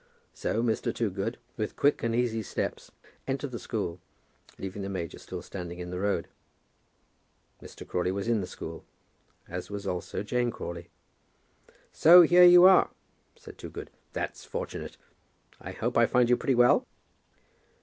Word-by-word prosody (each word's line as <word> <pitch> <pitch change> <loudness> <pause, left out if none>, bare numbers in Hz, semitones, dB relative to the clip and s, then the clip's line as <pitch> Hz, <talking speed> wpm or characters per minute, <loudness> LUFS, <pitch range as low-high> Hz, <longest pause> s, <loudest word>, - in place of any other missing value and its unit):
So 115 - -2
Mr. 115 -2 0
Toogood, 105 0 -3 0.2
with 110 -2 -3
quick 145 - +2
and 115 -1 -1
easy 120 -2 0
steps, 105 - -4 0.4
entered 135 0 -3
the 120 - -5
school, 90 -6 -4 0.6
leaving 95 +1 -6
the 100 - -4
major 85 -5 -5
still - - -8
standing 90 -2 -7
in 90 0 -7
the 90 - -4
road. 100 +1 -1 1.3
Mr. - - -11
Crawley 90 +1 -1
was 100 +2 -3
in 115 -3 +2
the 90 - -5
school; 80 0 -8 0.6
as 90 +1 -6
was 100 -1 -6
also 90 +1 -3
Jane 120 +3 0
Crawley. 85 -6 -7 1.0
"So 175 +2 +8
here 175 +2 +6
you 175 0 +8
are," 190 -1 +6 0.5
said - - -14
Toogood. - - -8 0.2
"That's - - -5
fortunate. - - -6 0.6
I - - -8
hope - - -3
I - - +5
find 125 -1 +3
you - - +6
pretty 130 +1 0
well?" 120 0 +4
110 Hz, 150 wpm, -28 LUFS, 90-125 Hz, 1.3 s, So